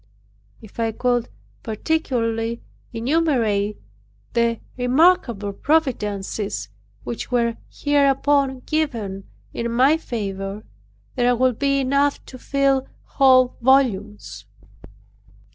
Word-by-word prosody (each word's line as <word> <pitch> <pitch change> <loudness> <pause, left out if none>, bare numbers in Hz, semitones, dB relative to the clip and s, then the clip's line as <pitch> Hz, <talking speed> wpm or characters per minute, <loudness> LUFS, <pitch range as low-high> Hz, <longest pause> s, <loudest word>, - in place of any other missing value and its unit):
If 215 +1 -13
I 225 -1 0
could 245 0 0 0.3
particularly 230 -2 -2 0.3
enumerate 230 -6 0 0.6
the 235 -1 +1 0.2
remarkable 250 - +2
providences 210 - -1 0.3
which 120 0 -5
were 235 -2 0
hereupon 280 -2 +1
given 230 -12 -2 0.3
in 235 0 -3
my 265 +6 +4
favor 200 -6 -5 0.5
there 245 0 +2
would 255 -1 +1
be 275 -1 +2
enough 280 +2 +1
to 255 - -11
fill 275 -1 +1 0.2
whole 255 -2 +4
volumes. 210 - +1
245 Hz, 90 wpm, -22 LUFS, 215-275 Hz, 0.6 s, my